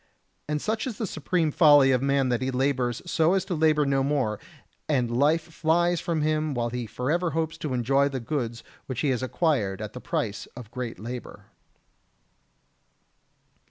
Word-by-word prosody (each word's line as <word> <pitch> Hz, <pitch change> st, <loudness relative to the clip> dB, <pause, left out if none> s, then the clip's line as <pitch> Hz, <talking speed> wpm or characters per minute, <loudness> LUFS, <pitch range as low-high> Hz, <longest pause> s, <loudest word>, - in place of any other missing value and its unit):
And 150 Hz, 0 st, 0 dB
such 220 Hz, -, -2 dB
is 230 Hz, -5 st, -5 dB
the 225 Hz, -, -2 dB
supreme 165 Hz, -2 st, -1 dB
folly 145 Hz, -4 st, +6 dB
of 125 Hz, -1 st, +2 dB
man 140 Hz, -1 st, +2 dB
that 120 Hz, 0 st, 0 dB
he 130 Hz, -, -1 dB
labours 130 Hz, -2 st, 0 dB
so 170 Hz, +1 st, +2 dB
as 190 Hz, -1 st, 0 dB
to 195 Hz, -, -3 dB
labour 155 Hz, -2 st, +3 dB
no 135 Hz, -1 st, +2 dB
more, 135 Hz, -7 st, 0 dB, 0.5 s
and 125 Hz, -5 st, +1 dB
life 150 Hz, +5 st, +3 dB
flies 170 Hz, +2 st, +1 dB
from 165 Hz, -4 st, -1 dB
him 155 Hz, -1 st, 0 dB
while 120 Hz, -1 st, -1 dB
he 125 Hz, -1 st, -4 dB
forever 150 Hz, -, -1 dB
hopes 160 Hz, 0 st, -1 dB
to 140 Hz, -4 st, -2 dB
enjoy 135 Hz, +4 st, +2 dB
the 135 Hz, -2 st, -3 dB
goods 120 Hz, -3 st, -3 dB, 0.2 s
which 130 Hz, -3 st, -3 dB
he 145 Hz, -, +1 dB
has 130 Hz, -2 st, 0 dB
acquired 130 Hz, -, 0 dB
at 105 Hz, -1 st, -6 dB
the 125 Hz, -, -8 dB
price 105 Hz, -2 st, -3 dB
of 120 Hz, -3 st, -10 dB
great 125 Hz, -2 st, -5 dB
labour. 120 Hz, +5 st, -8 dB
140 Hz, 175 wpm, -26 LUFS, 125-160 Hz, 0.5 s, folly